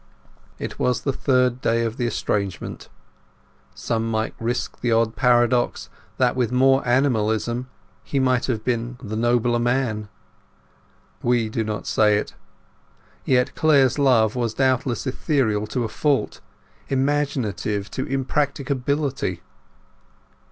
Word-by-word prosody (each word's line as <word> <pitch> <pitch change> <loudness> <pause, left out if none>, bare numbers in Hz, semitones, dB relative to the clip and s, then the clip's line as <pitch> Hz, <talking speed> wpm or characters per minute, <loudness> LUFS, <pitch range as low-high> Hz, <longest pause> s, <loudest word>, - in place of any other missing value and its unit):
It - - -6
was 125 -1 +1
the 135 - -1
third 125 -2 +1
day 115 0 +1
of 115 +2 -4
the 120 - 0
estrangement. 100 -4 -3 0.9
Some 115 0 -2
might 110 0 -1
risk 120 +2 -3
the 120 - 0
odd 115 0 +2
paradox 120 -1 +2 0.3
that 125 -1 +2
with 125 -2 0
more 135 +2 +4
animalism 120 -1 +1 0.3
he 140 - -1
would 130 -2 +2
have 115 -4 -2
been 120 0 -2
the 110 -1 -5
nobler 120 +1 +2
man. 120 -4 -1 1.1
We 120 -2 +1
do 110 +1 -1
not 105 -1 -4
say 105 -1 +3
it. - - -4 0.9
Yet 125 +1 +2
Clare's 145 -3 +3
love 115 -6 +3
was 120 -3 -1
doubtless 130 -2 0
ethereal 130 -6 0
to 125 +3 -2
a - - -1
fault, 140 +5 -1 0.5
imaginative 130 -8 -1
to 130 - -3
impracticability. 135 - -1
120 Hz, 125 wpm, -23 LUFS, 110-130 Hz, 1.1 s, more